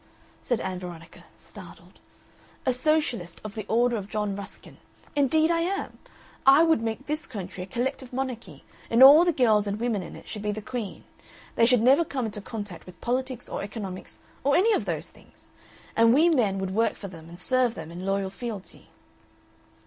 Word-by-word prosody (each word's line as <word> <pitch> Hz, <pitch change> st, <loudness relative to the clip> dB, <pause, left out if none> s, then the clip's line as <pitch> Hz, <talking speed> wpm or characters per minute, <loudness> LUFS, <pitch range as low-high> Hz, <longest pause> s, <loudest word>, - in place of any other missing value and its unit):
said 245 Hz, -, -1 dB
Ann 185 Hz, -1 st, -3 dB
Veronica, 175 Hz, -2 st, -10 dB
startled. -, -, -14 dB, 0.7 s
"A 255 Hz, -, +3 dB
Socialist 250 Hz, -, 0 dB
of 215 Hz, -1 st, -7 dB
the 215 Hz, -2 st, -6 dB
order 240 Hz, +1 st, +2 dB
of 200 Hz, -1 st, -6 dB
John 210 Hz, -2 st, -2 dB
Ruskin. 200 Hz, 0 st, -9 dB, 0.4 s
Indeed 310 Hz, +3 st, +3 dB
I 335 Hz, -, +2 dB
am! 370 Hz, +4 st, -3 dB, 0.4 s
I 275 Hz, +4 st, +7 dB
would 325 Hz, -7 st, +3 dB
make 230 Hz, +4 st, -3 dB
this 300 Hz, +1 st, -3 dB
country 195 Hz, -5 st, -7 dB
a 180 Hz, -, -6 dB
collective 250 Hz, +4 st, -3 dB
monarchy, 245 Hz, -, -5 dB, 0.3 s
and 235 Hz, +3 st, +6 dB
all 290 Hz, +5 st, +10 dB
the 350 Hz, -, +3 dB
girls 220 Hz, -8 st, +3 dB
and 200 Hz, +1 st, -2 dB
women 230 Hz, -4 st, 0 dB
in 175 Hz, -, -9 dB
it -, -, -13 dB
should 210 Hz, -, -6 dB
be 210 Hz, 0 st, -1 dB
the 210 Hz, -, -4 dB
Queen. 230 Hz, -2 st, -6 dB, 0.5 s
They 230 Hz, -, +4 dB
should 245 Hz, -2 st, +4 dB
never 270 Hz, +7 st, +6 dB
come 270 Hz, -6 st, -3 dB
into 210 Hz, -1 st, -5 dB
contact 205 Hz, -6 st, -7 dB
with 180 Hz, -, -13 dB
politics 255 Hz, 0 st, -2 dB
or -, -, -4 dB
economics 195 Hz, -2 st, -7 dB, 0.2 s
or 285 Hz, +1 st, +3 dB
any 435 Hz, +5 st, +4 dB
of -, -, 0 dB
those -, -, -3 dB
things. -, -, -17 dB, 0.4 s
And 230 Hz, +1 st, +5 dB
we 325 Hz, +4 st, +5 dB
men 225 Hz, -, +2 dB
would 190 Hz, -1 st, -3 dB
work 225 Hz, +3 st, +1 dB
for 200 Hz, -, -8 dB
them 165 Hz, -3 st, -12 dB
and 170 Hz, +1 st, -12 dB
serve 255 Hz, +2 st, +1 dB
them 160 Hz, -, -8 dB
in 175 Hz, +2 st, -7 dB
loyal 195 Hz, 0 st, -1 dB
fealty." 215 Hz, -2 st, -7 dB
230 Hz, 190 wpm, -26 LUFS, 195-265 Hz, 0.7 s, all